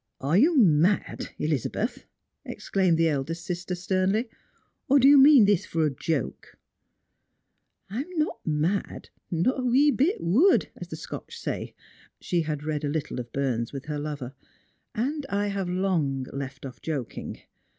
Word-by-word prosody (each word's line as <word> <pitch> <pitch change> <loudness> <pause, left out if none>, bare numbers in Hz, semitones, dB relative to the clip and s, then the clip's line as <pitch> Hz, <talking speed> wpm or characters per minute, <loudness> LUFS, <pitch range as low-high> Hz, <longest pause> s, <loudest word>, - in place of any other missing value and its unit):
"Are 140 +5 0
you 300 - +4
mad, 180 - +2
Elizabeth? 150 -5 -2 0.2
" - - -56
exclaimed 185 -4 0
the 165 0 +3
eldest 160 +3 -2
sister 180 -1 -3
sternly; 190 +6 0 0.3
" - - -44
or 280 - +6
do 270 0 +6
you 285 - +8
mean 275 -4 +8
this 200 -3 +3
for 165 -1 0
a 150 - +1
joke? 150 +2 -4 0.4
" - - -51
" - - -50
I 225 +6 -2
am 355 +4 -9
not 305 -7 0
mad, 160 +6 -2 0.2
not 175 +11 +1
a - - -2
wee 265 +4 +4
bit 300 +9 +1
wud, 245 - +3
as - - -8
the - - -7
Scotch - - -8
say - - -5
" - - -26
— - - -46
Bhe 175 -2 -1
had 150 -2 -3
read 155 -1 -2
a 145 - -1
httle 150 -3 -3
of 120 -1 -7
Burns 125 -4 -1
with 135 0 -6
her 150 -1 -3
lover 145 -4 -5 0.2
— - - -39
" - - -40 0.2
and 300 -1 -5
I 205 +1 0
have 195 -2 -3
long 170 -8 0
left 140 0 -6
off 130 - -9
joking. 140 -7 -5
170 Hz, 185 wpm, -26 LUFS, 150-210 Hz, 0.4 s, you